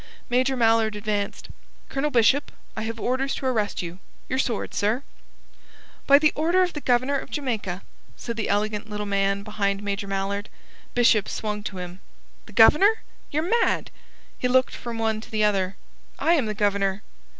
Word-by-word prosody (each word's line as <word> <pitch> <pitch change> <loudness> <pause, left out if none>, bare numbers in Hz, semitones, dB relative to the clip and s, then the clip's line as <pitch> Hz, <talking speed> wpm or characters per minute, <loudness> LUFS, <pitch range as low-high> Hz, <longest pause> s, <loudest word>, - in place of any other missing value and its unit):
Major 255 +2 +2
Mallard 225 -2 +3
advanced. 205 -1 -3 0.4
"Colonel 275 +2 -1
Bishop, 250 +3 +3 0.2
I 220 - -3
have 225 +1 -4
orders 260 +3 0
to - - -6
arrest 215 -7 0
you. 175 +2 -7 0.3
Your 260 - 0
sword, 235 -4 -1
sir!" 220 +6 0 1.0
"By 280 0 +8
order 340 +4 +3
of 360 - -1
the 295 - -5
Governor 255 +3 +2
of - - -9
Jamaica," 215 -10 -3 0.3
said 235 - -5
the 225 - -2
elegant 210 +1 -1
little 210 0 -4
man 200 0 0
behind 200 -1 -1
Major 200 0 -3
Mallard. 195 +1 -2 0.5
Bishop 230 -4 +4
swung 210 -1 -3
to 195 - -5
him. 180 0 -7 0.5
"The 215 - -13
Governor? 345 - +6 0.3
Ye're 305 +2 0 0.2
mad!" - - 0 0.5
He 250 - +1
looked 255 +1 +3
from 235 -1 -6
one 220 -1 0
to - - -12
the 215 -1 0
other. 195 -2 +1 0.4
"I 335 - +3
am 280 -9 +2
the 215 - -3
Governor." 200 0 0
220 Hz, 165 wpm, -25 LUFS, 200-255 Hz, 1.0 s, By